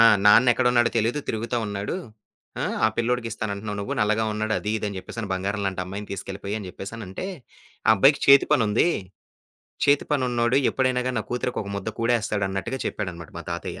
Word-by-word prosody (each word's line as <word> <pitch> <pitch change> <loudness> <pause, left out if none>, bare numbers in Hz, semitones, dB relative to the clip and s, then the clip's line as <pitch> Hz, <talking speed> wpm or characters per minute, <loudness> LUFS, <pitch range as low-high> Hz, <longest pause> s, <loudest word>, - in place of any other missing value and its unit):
ఆ! - - +9 0.2
నాన్న 115 +4 +7
ఎక్కడు 125 +1 +2
ఉన్నాడో 120 -1 +4
తెలీదు 115 +7 0
తిరుగుతా 115 +2 -2
ఉన్నాడు. 100 - -3 0.7
ఆ! - - +1 0.2
ఆ - - +7
పిల్లోడికి 120 0 0
ఇస్తానంటున్నావు 105 -1 -4
నువ్వు. 100 - -3
నల్లగా 110 +1 +2
ఉన్నాడు 110 0 -1
అది 105 - -3
ఇది 105 - -3
అని 100 - -6
చెప్పేసని 110 +2 -6
బంగారం 100 +2 -2
లాంటి 95 -1 -2
అమ్మాయిని 100 +3 -7
తీసుకెళ్ళపోయి 100 +1 -5
అని 100 -4 -7
చెప్పేసనంటే. 100 - -7 0.6
ఆ - - +9
అబ్బాయికి 135 +8 +5
చేతి 140 0 +8
పని 120 - +4
ఉంది. 115 +11 +3 1.0
చేతి 140 0 +4
పను 140 -3 +2
ఉన్నోడు 120 +2 +2
ఎప్పుడైనాగా 130 -1 +1
నా - - -1
కూతురికి 125 0 -2
ఒక 100 - -8
ముద్ద 100 +1 -4
కుడేస్తాడు 115 -3 +1
అన్నట్టుగా 110 +7 -3
చెప్పాడనమాట 85 -5 -5
మా - - -6
తాతయ్య. - - -5
110 Hz, 185 wpm, -24 LUFS, 100-120 Hz, 1.0 s, ఆ